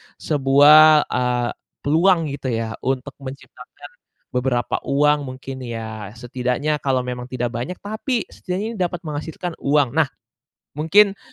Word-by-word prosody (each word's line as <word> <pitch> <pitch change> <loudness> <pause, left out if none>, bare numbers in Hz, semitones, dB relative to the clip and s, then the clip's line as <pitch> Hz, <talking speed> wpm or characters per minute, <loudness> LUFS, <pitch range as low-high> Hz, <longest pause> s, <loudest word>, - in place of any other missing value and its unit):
sebuah, 150 +2 +6
eee, 125 -1 0 0.3
peluang 170 +5 +4
gitu 140 -1 -5
ya, 115 -2 -2
untuk 135 +1 -2
menciptakan 130 0 -11 0.4
beberapa 125 -1 0
uang 145 0 +2
mungkin 135 0 -8
ya? 110 -2 -6
Setidaknya 125 +5 -2
kalau 130 -3 0
memang 125 0 -5
tidak 125 -2 -3
banyak, 120 +9 -4
tapi 220 +3 -2
setidaknya 185 +3 -4
ini 230 - -8
dapat 175 -1 -2
menghasilkan 160 +2 -5
uang. 140 -3 +2
Nah, 160 +1 +2 0.7
mungkin 195 +6 +4
140 Hz, 125 wpm, -21 LUFS, 125-155 Hz, 0.7 s, sebuah